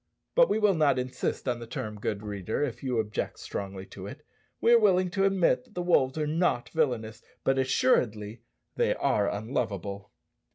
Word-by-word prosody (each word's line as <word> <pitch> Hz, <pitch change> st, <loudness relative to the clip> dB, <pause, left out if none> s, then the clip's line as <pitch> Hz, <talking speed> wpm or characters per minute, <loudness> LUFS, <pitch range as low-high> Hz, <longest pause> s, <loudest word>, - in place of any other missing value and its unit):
But -, -, +5 dB
we -, -, +2 dB
will 210 Hz, -2 st, +4 dB
not 150 Hz, -6 st, +3 dB
insist 125 Hz, +1 st, -3 dB
on 120 Hz, -2 st, 0 dB
the 115 Hz, -, -8 dB
term, 105 Hz, -2 st, -5 dB
good 105 Hz, 0 st, -3 dB
reader, 105 Hz, +4 st, -3 dB
if 120 Hz, -4 st, -3 dB
you 130 Hz, -3 st, -1 dB
object 110 Hz, -1 st, -2 dB
strongly 95 Hz, -1 st, -6 dB
to -, -, -8 dB
it. -, -, -10 dB, 0.3 s
We 235 Hz, -, +4 dB
are 235 Hz, -, +8 dB
willing 185 Hz, -4 st, +3 dB
to 195 Hz, 0 st, +1 dB
admit 195 Hz, +5 st, +2 dB
that 235 Hz, -, -24 dB
the 180 Hz, -, -2 dB
wolves 135 Hz, -6 st, +2 dB
are 155 Hz, -, 0 dB
not 155 Hz, -5 st, 0 dB
villanous, 115 Hz, -8 st, -1 dB, 0.2 s
but, 135 Hz, 0 st, +2 dB
assuredly, 115 Hz, -4 st, +1 dB, 0.3 s
they -, -, +2 dB
are 100 Hz, -1 st, +1 dB
unlovable. 100 Hz, -3 st, -3 dB
125 Hz, 180 wpm, -28 LUFS, 105-170 Hz, 0.3 s, are